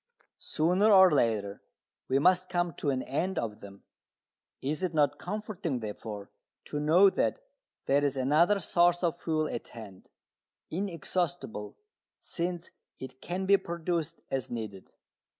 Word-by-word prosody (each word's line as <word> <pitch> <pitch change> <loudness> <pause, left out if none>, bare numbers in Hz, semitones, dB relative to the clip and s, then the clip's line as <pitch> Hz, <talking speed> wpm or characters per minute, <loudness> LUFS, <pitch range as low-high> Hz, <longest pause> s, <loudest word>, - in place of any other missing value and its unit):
Sooner 180 +7 +2
or 190 -2 +8
later 110 -8 +1 0.5
we 130 - +2
must 185 +5 +3
come 175 -1 0
to 145 - -2
an 130 -2 0
end 170 +7 -2
of 105 -2 -3
them. 100 -1 -12 0.8
Is 150 +5 -3
it 180 -3 -2
not 145 -2 +2
comforting, 190 - -4
therefore, 105 -2 -7 0.3
to 145 - -4
know 175 +6 +5
that - - 0 0.5
there 140 +1 +3
is 140 -1 0
another 155 +10 +3
source 175 -1 +2
of 170 0 0
fuel 155 -1 0
at - - -5
hand, 105 -5 -12 0.6
inexhaustible, 175 - -3 0.4
since 175 0 -4 0.3
it 130 0 -10
can 185 +2 -3
be 200 +1 +6
produced 170 -2 -3
as 135 -3 -2
needed. 110 -5 -6
160 Hz, 135 wpm, -29 LUFS, 130-180 Hz, 0.8 s, or